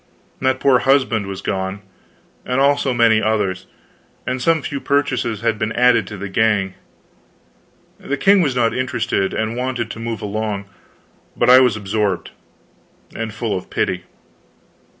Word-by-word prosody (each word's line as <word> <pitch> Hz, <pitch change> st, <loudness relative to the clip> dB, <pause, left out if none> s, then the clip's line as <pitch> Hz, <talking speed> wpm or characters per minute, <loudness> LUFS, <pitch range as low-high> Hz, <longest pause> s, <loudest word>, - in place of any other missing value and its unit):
That 130 Hz, 0 st, +1 dB
poor 135 Hz, -3 st, +4 dB
husband 130 Hz, -7 st, +2 dB
was 95 Hz, -1 st, -6 dB
gone, 95 Hz, +1 st, -3 dB, 0.6 s
and 125 Hz, +1 st, -1 dB
also 140 Hz, -1 st, +2 dB
many 115 Hz, -2 st, +4 dB
others; 105 Hz, -4 st, -1 dB, 0.6 s
and 130 Hz, 0 st, -2 dB
some 160 Hz, +1 st, +2 dB
few 140 Hz, -, -4 dB
purchases 130 Hz, -7 st, 0 dB
had 115 Hz, -2 st, 0 dB
been 110 Hz, -, -1 dB
added 120 Hz, -4 st, +3 dB
to 105 Hz, -, -7 dB
the 100 Hz, +2 st, -5 dB
gang. 100 Hz, -1 st, +1 dB, 1.3 s
The 140 Hz, -, -3 dB
king 200 Hz, +2 st, +4 dB
was 140 Hz, -7 st, 0 dB
not 115 Hz, -2 st, +2 dB
interested, 125 Hz, -6 st, -1 dB
and 110 Hz, +1 st, -2 dB
wanted 125 Hz, -2 st, -3 dB
to -, -, -8 dB
move 115 Hz, -2 st, -4 dB
along, 105 Hz, -1 st, -3 dB, 0.7 s
but -, -, +4 dB
I 130 Hz, -, +9 dB
was 125 Hz, -4 st, +3 dB
absorbed, 100 Hz, -2 st, -2 dB, 0.8 s
and 115 Hz, -1 st, -4 dB
full 110 Hz, -1 st, -3 dB
of 95 Hz, -, -6 dB
pity. 90 Hz, -1 st, -2 dB
115 Hz, 150 wpm, -19 LUFS, 105-130 Hz, 1.3 s, I